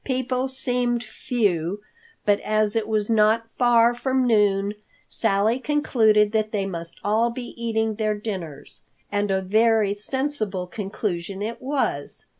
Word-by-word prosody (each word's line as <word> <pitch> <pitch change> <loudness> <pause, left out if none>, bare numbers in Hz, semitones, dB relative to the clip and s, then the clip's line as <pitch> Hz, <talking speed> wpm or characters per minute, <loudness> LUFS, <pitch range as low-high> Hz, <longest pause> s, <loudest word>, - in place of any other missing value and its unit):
People 255 0 -1
seemed 245 -2 -1
few, 205 -6 -1 0.4
but 205 -1 +3
as 215 0 +1
it 220 -2 0
was 215 -2 0
not 225 0 +3
far 240 -1 +5
from 260 +1 0
noon, 205 -3 +2 0.3
Sally 220 +3 +1
concluded 220 -8 +3
that 215 -1 0
they 200 -3 -1
must 170 -3 -5
all 220 +3 +2
be 240 +1 -7
eating 225 -1 -1
their 215 0 -1
dinners. 190 -9 -7 0.3
And 205 0 0
a 190 0 +1
very 215 +1 +3
sensible 215 -4 -2
conclusion 195 -1 -4
it 230 +2 -5
was. 260 - -2
215 Hz, 135 wpm, -24 LUFS, 205-240 Hz, 0.4 s, far